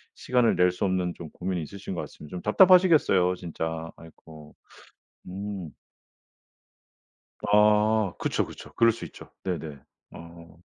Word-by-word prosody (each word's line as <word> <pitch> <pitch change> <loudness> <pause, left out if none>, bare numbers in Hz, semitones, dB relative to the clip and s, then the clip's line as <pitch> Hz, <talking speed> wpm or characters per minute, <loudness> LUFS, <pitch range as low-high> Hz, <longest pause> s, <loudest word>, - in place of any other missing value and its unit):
시간을 125 -2 +1
낼 90 0 +3
수 90 - -6
없는 90 -2 -1
좀 80 - -9
고민이 90 +1 -4
있으신 95 +5 -7
것 90 - -3
같습니다. 75 - -11
좀 90 - -5
답답하시겠어요 155 - +5
진짜. 80 -1 -5
아이고. 80 -2 -15 0.7
음. 95 -2 -6 1.7
아 105 -1 +3
그쵸, - - -1
그쵸. - - -12
그럴 115 0 +5
수 115 - -8
있죠. - - -13
네네. 80 -6 -4 0.3
어. 85 0 -13
90 Hz, 260 characters per minute, -26 LUFS, 85-105 Hz, 1.7 s, 답답하시겠어요